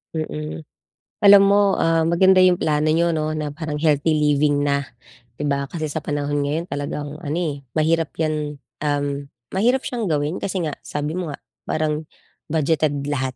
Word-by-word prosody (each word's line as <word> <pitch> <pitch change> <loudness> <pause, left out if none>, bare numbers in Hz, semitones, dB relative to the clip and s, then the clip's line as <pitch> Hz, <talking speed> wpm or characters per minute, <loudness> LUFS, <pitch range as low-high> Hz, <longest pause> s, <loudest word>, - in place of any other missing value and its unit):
Mm, 155 0 -4 0.6
alam 200 0 +9
mo, 200 -1 +3
ah, 165 0 +3
maganda 185 +3 +5
yung 180 -1 +4
plano 155 0 +1
niyo 170 0 +2
'no, 155 0 -1
na 155 -1 -3
parang 155 -2 -4
healthy 155 0 +2
living 150 -1 +2
na, 140 0 +1 0.6
'di 145 - -1
ba, 140 0 0
kasi 155 -3 -3
sa 150 +1 -4
panahon 145 0 -1
ngayon 160 +5 -2
talagang 145 +1 -4
ano, 150 +3 -2
eh, 145 -5 -3
mahirap 160 +1 +1
'yan 150 -2 -2 0.2
um, 145 -1 -1 0.3
mahirap 245 +6 +3
siyang 225 -8 -2
gawin 150 +3 0
kasi 190 -1 -2
nga 145 - -4
sabi 150 +3 -3
mo 175 -5 -3
nga, - - -8 0.2
parang 155 0 -1 0.5
budgeted 150 -2 +1
lahat, 130 -3 -2
155 Hz, 165 wpm, -22 LUFS, 145-165 Hz, 0.6 s, alam